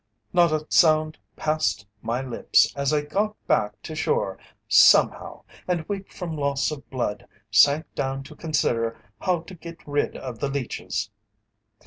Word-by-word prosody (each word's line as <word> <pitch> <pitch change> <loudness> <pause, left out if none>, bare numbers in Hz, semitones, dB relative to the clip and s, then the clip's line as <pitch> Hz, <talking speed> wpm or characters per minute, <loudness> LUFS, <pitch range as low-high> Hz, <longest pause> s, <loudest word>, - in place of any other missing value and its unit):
Not 175 -2 +4
a 155 0 -1
sound 155 -1 +3 0.2
passed 130 -10 -1 0.2
my 120 +3 -2
lips 125 -3 +2
as 140 0 0
I 150 -1 +2
got 205 +8 -1
back 105 0 +1
to 160 - -7
shore, 460 - -1 0.3
somehow, - - +5 0.2
and, 175 -3 -1
weak 195 -1 -5
from 170 -4 -5
loss 140 -1 0
of 150 -2 -8
blood, 120 -6 -3 0.2
sank 145 +8 +5
down 135 0 -3
to 150 +3 -13
consider 120 -8 -1 0.2
how 180 -3 0
to 175 - -12
get 170 -2 -11
rid 145 0 -1
of 125 -4 -7
the 140 - -1
leeches. 135 -3 -3
150 Hz, 150 wpm, -24 LUFS, 135-165 Hz, 0.3 s, somehow